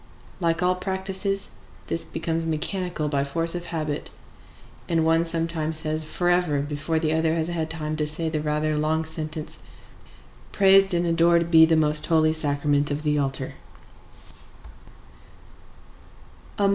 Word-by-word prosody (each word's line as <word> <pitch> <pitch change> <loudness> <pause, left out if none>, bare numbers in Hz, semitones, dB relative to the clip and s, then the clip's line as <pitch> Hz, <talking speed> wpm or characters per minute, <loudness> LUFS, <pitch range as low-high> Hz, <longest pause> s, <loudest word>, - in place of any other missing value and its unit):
Like 165 -1 0
all 180 0 +3
practices, 190 +1 -2 0.3
this 165 - -3
becomes 165 0 -3
mechanical 170 0 -2
by 140 -2 0
force 165 +4 0
of 175 -1 -5
habit; 155 -3 -4 0.8
and 165 -2 +1
one 165 +1 +3
sometimes 165 -1 0
says 155 0 -2
forever 175 -2 0
before 150 +2 -2
the 160 -1 0
other 160 0 +1
has 165 0 -1
had 165 -2 -3
time 155 -1 -4
to 150 -1 -1
say 160 +2 0
the 155 -1 -2
rather 150 0 -1
long 160 +1 0
sentence, 155 -1 -5 0.9
"Praised 195 -1 +5
and 170 0 +1
adored 170 0 +2
be 160 -1 +8
the 165 - +3
most 150 -1 +3
Holy 155 -1 +3
Sacrament 145 -1 +1
of 145 +1 -3
the 150 -1 +1
altar." 135 -1 -2
160 Hz, 135 wpm, -24 LUFS, 155-170 Hz, 0.9 s, be